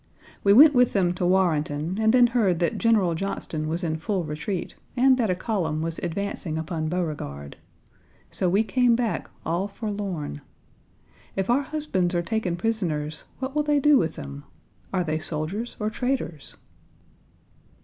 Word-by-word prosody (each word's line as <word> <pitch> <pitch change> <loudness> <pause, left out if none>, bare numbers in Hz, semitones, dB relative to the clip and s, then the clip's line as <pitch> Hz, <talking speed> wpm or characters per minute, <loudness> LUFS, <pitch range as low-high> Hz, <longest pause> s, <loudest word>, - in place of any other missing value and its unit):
We 200 - +5
went 290 +8 +9
with 250 -2 +4
them 180 -3 +2
to 180 0 -1
Warrenton, 165 -1 +1
and 220 0 +4
then 245 0 +6
heard 225 -7 +2
that 170 -1 0
General 215 -7 +3
Johnston 160 -3 -3
was 165 +3 -1
in 160 -2 -1
full 185 +2 -1
retreat, 155 +4 -4 0.2
and 260 +1 +6
that 225 -4 +1
a 180 - +2
column 175 -6 -1
was 165 0 -3
advancing 175 -2 -3
upon 160 -1 -3
Beauregard. 145 - -4 0.8
So 185 - 0
we 200 +5 +3
came 245 +1 +3
back, 235 -2 -2 0.2
all 175 +4 0
forlorn. 200 - -4 0.9
If 195 +3 0
our 260 +4 +3
husbands 265 - -1
are 175 - +1
taken 210 -3 -1
prisoners, 170 -7 -2
what 265 +1 -4
will 300 - +2
they 295 -1 +2
do 295 0 +5
with 165 - -1
them? 70 0 -8 0.5
Are 185 -2 +1
they 155 -1 -1
soldiers 160 +9 -3
or 210 0 -1
traitors? 245 - -3
185 Hz, 160 wpm, -25 LUFS, 160-225 Hz, 0.9 s, went